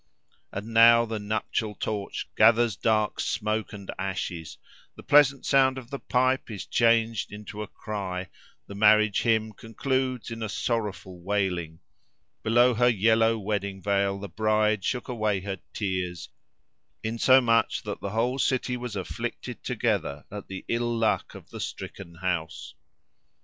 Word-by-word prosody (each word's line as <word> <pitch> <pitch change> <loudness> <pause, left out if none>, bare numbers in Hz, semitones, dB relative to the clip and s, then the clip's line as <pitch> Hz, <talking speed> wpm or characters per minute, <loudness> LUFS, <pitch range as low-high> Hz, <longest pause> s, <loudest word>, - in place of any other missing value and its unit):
And 105 +4 -6
now 115 +1 +7
the 110 -1 -4
nuptial 105 0 -2
torch 105 -2 -4
gathers 115 -1 +5
dark 110 0 +1
smoke 110 +1 -1
and 100 -2 -7
ashes: 95 -4 -4 0.4
the - - -12
pleasant 140 -1 +4
sound 135 -1 +4
of 130 0 -9
the 140 - -4
pipe 130 +1 +1
is 105 -4 -6
changed 115 -3 +2
into 105 0 -8
a 105 - -5
cry: 95 -4 -5 0.4
the - - -10
marriage 105 0 +4
hymn 110 -2 +1
concludes 130 +3 -2
in 115 0 -6
a 110 - -3
sorrowful 105 -5 -3
wailing: 90 -4 -2 0.6
below 120 +3 +4
her 120 +2 +4
yellow 115 +1 +3
wedding 100 -2 -3
veil 100 0 +1
the 100 +1 -6
bride 110 +1 +1
shook 125 +3 -2
away 110 -6 -1
her 95 0 -5
tears; 90 -5 -3 0.7
insomuch 115 +1 +3
that - - -5
the 100 - -3
whole 120 +6 0
city 125 -1 +1
was 120 -3 -5
afflicted 95 -3 -5
together 70 +1 -1
at 105 -1 -7
the 95 -1 -7
ill 120 0 0
luck 115 -1 0
of - - -13
the - - -8
stricken 85 -4 -7
house. 85 -2 -3
110 Hz, 145 wpm, -27 LUFS, 100-115 Hz, 0.7 s, now